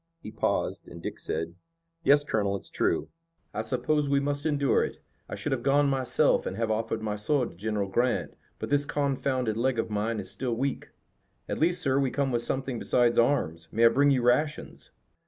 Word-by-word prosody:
He 110 - -9
paused, 110 - -1
and - - -10
Dick - - -6
said: 80 +1 -3 0.5
"Yes, 145 -1 +5
Colonel, 100 -7 0
it's 95 - -8
true." - - 0 0.4
"I 110 - -2
suppose 130 +6 0
we 140 0 +3
must 145 +2 -1
endure 140 -3 +2
it. - - -5 0.3
I - - -4
should 145 - -4
have 130 -3 0
gone 140 +2 +3
myself 130 -2 +2
and 95 - -4
have 115 -1 0
offered 110 0 -2
my 105 -1 -2
sword 125 +5 0
to - - -17
General 105 +1 -2
Grant, 120 +6 0 0.2
but - - -6
this 145 0 +3
confounded 130 -5 -1
leg 125 +1 +1
of 115 - -2
mine 105 +2 -1
is 95 - -5
still 125 -3 -2
weak." 135 +3 -3 0.6
"At - - -3
least, 175 +2 +2
sir, 135 -1 +2
we 135 -2 +1
come 140 0 -1
with 120 -1 +1
something 130 -1 -1
besides 120 -1 +2
arms. 85 - +1
May 115 +2 +3
I - - +9
bring 140 +4 +3
you 130 -3 +2
rations?" 150 +5 0
125 Hz, 200 wpm, -28 LUFS, 110-140 Hz, 0.6 s, I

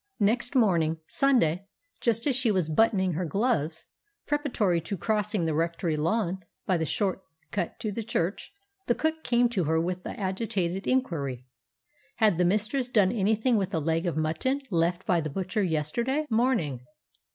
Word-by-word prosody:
Next 235 +5 +1
morning, 170 -9 +3
Sunday, 195 - +2 0.3
just 230 -1 0
as 280 -4 +2
she 255 -2 +2
was 185 -6 +1
buttoning 190 -2 +3
her 175 +4 -2
gloves, 160 - 0 0.4
preparatory 245 - +1
to 190 +5 -4
crossing 210 -3 0
the 160 - 0
rectory 165 +1 0
lawn 185 +4 0 0.3
by 185 - +2
the 160 -1 -1
short 190 +2 -1 0.3
cut 185 0 -3
to 215 -3 -2
the 230 - -3
church, 195 - -2 0.4
the 240 - +3
cook 315 0 -1
came 240 0 +3
to 195 -8 0
her 160 +2 +2
with 180 +2 -2
the - - -7
agitated 190 -2 -2
inquiry: 140 - -1 0.7
Had 215 -7 +3
the 180 - +4
mistress 215 +7 +1
done 205 -6 +3
anything 220 +2 +2
with 195 -2 0
the 165 - -1
leg 165 +3 0
of 170 - -1
mutton 160 - 0
left 170 +1 +1
by 175 -3 +2
the 155 - -3
butcher 190 +6 -2
yesterday 200 - 0
morning? 220 - +1
190 Hz, 165 wpm, -27 LUFS, 165-230 Hz, 0.7 s, the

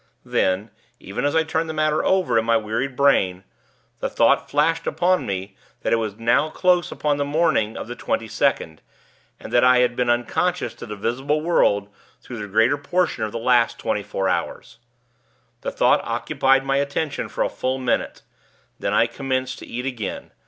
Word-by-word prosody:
Then, 95 +3 0 0.3
even 100 +8 -4
as 145 - 0
I 160 - +4
turned 160 +1 -2
the 160 - -4
matter 155 0 +1
over 185 -11 +2
in - - -1
my 115 0 +3
wearied 115 +5 -3
brain, 95 -10 +2 0.6
the - - -2
thought - - +2
flashed 150 +3 +1
upon 180 +1 +1
me 95 0 -4 0.3
that - - 0
it - - +4
was 110 -3 -3
now 120 +7 +2
close 180 +1 +2
upon 145 -1 -1
the 145 - 0
morning 145 -7 +1
of - - -6
the 120 - -6
twenty 115 - -2
second, 110 - -1 0.6
and - - -10
that 120 - +5
I 125 0 +6
had 125 -1 +2
been 125 -1 0
unconscious 120 +4 0
to - - -10
the 105 - -6
visible 135 +8 -1
world 100 -11 +2 0.3
through 120 -3 -9
the 105 - -5
greater 110 +8 +2
portion 175 -5 0
of 105 - -6
the - - -4
last 120 0 +2
twenty 105 - -2
four 95 -1 -3
hours. 95 - -3 0.8
The - - -3
thought - - +3
occupied 135 0 +1
my 135 0 +1
attention 140 +1 -2
for - - -1
a - - +1
full 130 +1 -2
minute; 130 -2 -2 0.6
then - - -1
I - - +5
commenced 130 -1 -3
to - - -11
eat 125 +2 -5
again. 120 -7 -5
125 Hz, 190 wpm, -22 LUFS, 110-145 Hz, 0.8 s, I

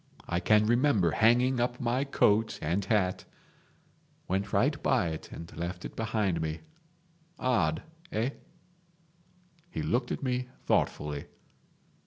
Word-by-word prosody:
I 85 - 0
can 105 +3 +4
remember 115 - +3
hanging 120 +5 +4
up 120 0 0
my 125 +3 0
coat 110 -5 +2
and 85 +6 0
hat... 95 -3 +1 1.0
Went 95 +2 -1
right 145 +2 +2
by 120 -10 +2
it 80 -1 -7
and 85 +1 -9
left 85 +1 -4
it - - -7
behind 105 -6 0
me. 80 0 -3 0.8
Odd, 85 -11 +1 0.3
eh?" 120 0 0 1.4
He - - -4
looked 120 +1 0
at - - -3
me 125 -1 -1 0.2
thoughtfully. 75 -1 0
110 Hz, 125 wpm, -30 LUFS, 85-125 Hz, 1.4 s, can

